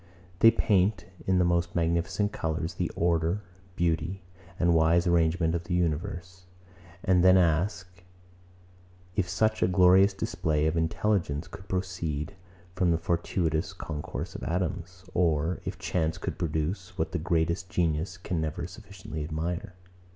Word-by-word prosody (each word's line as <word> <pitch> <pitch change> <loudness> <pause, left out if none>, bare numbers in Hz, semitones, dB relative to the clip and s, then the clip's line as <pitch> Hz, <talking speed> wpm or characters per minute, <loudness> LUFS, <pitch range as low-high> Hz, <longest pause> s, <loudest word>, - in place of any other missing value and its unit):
They 115 - +9
paint, 100 -3 +2 0.2
in 95 -1 +3
the 90 - +4
most 85 0 +1
magnificent 85 +5 0
colours, 80 +1 -2
the - - -2
order, 85 +3 +1 0.3
beauty, 85 +2 -1 0.4
and 85 0 +4
wise 85 +2 +4
arrangement 85 -1 +2
of 85 0 -2
the 85 - -1
universe; 85 +2 -2 0.6
and 90 -2 +3
then 95 0 +7
ask, 90 +1 0 1.1
if 90 -3 0
such 110 +5 +1
a 90 - +4
glorious 95 +2 +5
display 80 -4 0
of 80 +1 +1
intelligence 80 -2 0
could 90 +2 -11
proceed 90 -3 -3 0.4
from 90 -1 +1
the 85 - +3
fortuitous 85 0 -1
concourse 80 -5 -5
of - - -7
atoms, 90 +1 -3
or 85 -1 +1
if - - -4
chance 80 -2 -1
could - - -5
produce 90 +4 -2
what 80 -2 -1
the 90 - -1
greatest 85 +2 0
genius 85 0 0
can 85 -2 -3
never 80 -1 -3
sufficiently 95 -6 -8
admire. 85 +4 -4
85 Hz, 140 wpm, -28 LUFS, 80-90 Hz, 1.1 s, They